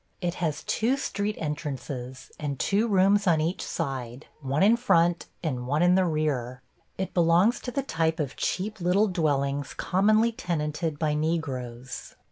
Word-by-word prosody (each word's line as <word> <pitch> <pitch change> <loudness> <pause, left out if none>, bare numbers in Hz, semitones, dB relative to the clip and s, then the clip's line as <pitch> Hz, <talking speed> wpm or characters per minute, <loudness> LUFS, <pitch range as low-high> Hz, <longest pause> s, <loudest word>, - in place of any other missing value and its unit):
It 175 -2 -1
has 155 -3 -1
two 245 +5 +1
street 210 -5 -2
entrances 135 -4 -5
and 145 -2 -3
two 210 +3 +2
rooms 200 0 +3
on 165 -3 +4
each 165 +4 -1
side, 135 -4 -4 0.2
one 140 +4 +1
in 215 +4 +6
front 175 -8 +2 0.2
and 125 -6 -2
one 150 +5 +2
in 180 0 +5
the 185 0 +4
rear. 135 -6 -1 0.3
It 190 - -3
belongs 175 +7 +4
to 250 - -5
the 275 +2 -1
type 160 -7 0
of 140 -3 -2
cheap 205 +2 -2
little 185 +5 +3
dwellings 145 -6 0
commonly 215 +5 +3
tenanted 160 -5 -2
by 150 -1 0
Negroes. 135 -6 -3
165 Hz, 155 wpm, -27 LUFS, 140-190 Hz, 0.3 s, in